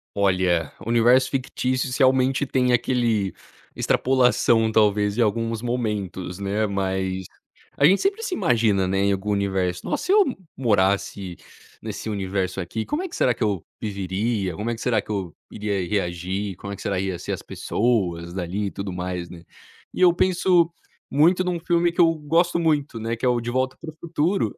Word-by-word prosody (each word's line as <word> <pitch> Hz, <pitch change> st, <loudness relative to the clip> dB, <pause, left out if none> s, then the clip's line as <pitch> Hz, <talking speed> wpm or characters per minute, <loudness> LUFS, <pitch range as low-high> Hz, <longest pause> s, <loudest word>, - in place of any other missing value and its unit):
Olha, 90 Hz, -5 st, +1 dB
universo 120 Hz, +3 st, +4 dB
fictícios 130 Hz, -1 st, -1 dB
realmente 130 Hz, 0 st, +3 dB
tem 125 Hz, -2 st, +1 dB
aquele 115 Hz, -5 st, +1 dB, 0.4 s
extrapolação 125 Hz, -3 st, +3 dB
talvez 105 Hz, -1 st, +2 dB
em -, -, +2 dB
alguns 115 Hz, +1 st, 0 dB
momentos, 105 Hz, -7 st, -3 dB
né, 100 Hz, +2 st, 0 dB
mas, 95 Hz, -1 st, -2 dB, 0.5 s
a 140 Hz, -, +5 dB
gente 190 Hz, +5 st, +4 dB
sempre 400 Hz, +3 st, 0 dB
se 430 Hz, -5 st, -2 dB
imagina, 110 Hz, -, +2 dB
né, 95 Hz, +1 st, 0 dB
em 100 Hz, -, +3 dB
algum 100 Hz, +2 st, -2 dB
universo, 95 Hz, -3 st, -1 dB
nossa -, -, -2 dB
se 370 Hz, -, +1 dB
eu 415 Hz, 0 st, +7 dB, 0.3 s
morasse 100 Hz, -5 st, 0 dB, 0.5 s
nesse 110 Hz, -, -5 dB
universo 95 Hz, -2 st, -2 dB
aqui, 100 Hz, +5 st, -4 dB
como 305 Hz, +4 st, -2 dB
é 375 Hz, -, -4 dB
que 335 Hz, -, -8 dB
será 125 Hz, -, +3 dB
que -, -, -7 dB
eu 100 Hz, -6 st, 0 dB, 0.2 s
viveria? 100 Hz, -1 st, -2 dB
Como 105 Hz, +6 st, -4 dB
é 120 Hz, -, 0 dB
que 115 Hz, -, -10 dB
será 125 Hz, -3 st, +2 dB
que -, -, -14 dB
eu 95 Hz, -6 st, -3 dB, 0.2 s
iria 100 Hz, -4 st, -2 dB
reagir? 95 Hz, +1 st, -2 dB
Como 100 Hz, -, -8 dB
é -, -, -5 dB
que -, -, -11 dB
será 95 Hz, -2 st, -1 dB
ia 95 Hz, -2 st, -2 dB
ser -, -, -5 dB
as -, -, -3 dB
pessoas 90 Hz, -7 st, -1 dB
dali 95 Hz, +3 st, -2 dB
e 100 Hz, -, -3 dB
tudo 100 Hz, -1 st, -5 dB
mais, 90 Hz, -1 st, -4 dB
né. 85 Hz, -2 st, -11 dB, 0.5 s
E -, -, -2 dB
eu 175 Hz, -, +7 dB
penso 175 Hz, -2 st, +3 dB, 0.4 s
muito 170 Hz, +6 st, +4 dB
num 180 Hz, -1 st, -1 dB
filme 170 Hz, 0 st, +2 dB
que 175 Hz, -, -1 dB
eu 165 Hz, -1 st, +5 dB
gosto 165 Hz, +3 st, +1 dB
muito, 150 Hz, -7 st, 0 dB
né, 115 Hz, +1 st, -2 dB
que 115 Hz, -, -6 dB
é -, -, +4 dB
o 120 Hz, -1 st, +2 dB
De 120 Hz, +1 st, -4 dB
volta 130 Hz, +1 st, 0 dB
para 160 Hz, -, -7 dB
o 155 Hz, -, -21 dB
futuro. 170 Hz, +3 st, 0 dB
110 Hz, 185 wpm, -23 LUFS, 95-130 Hz, 0.5 s, eu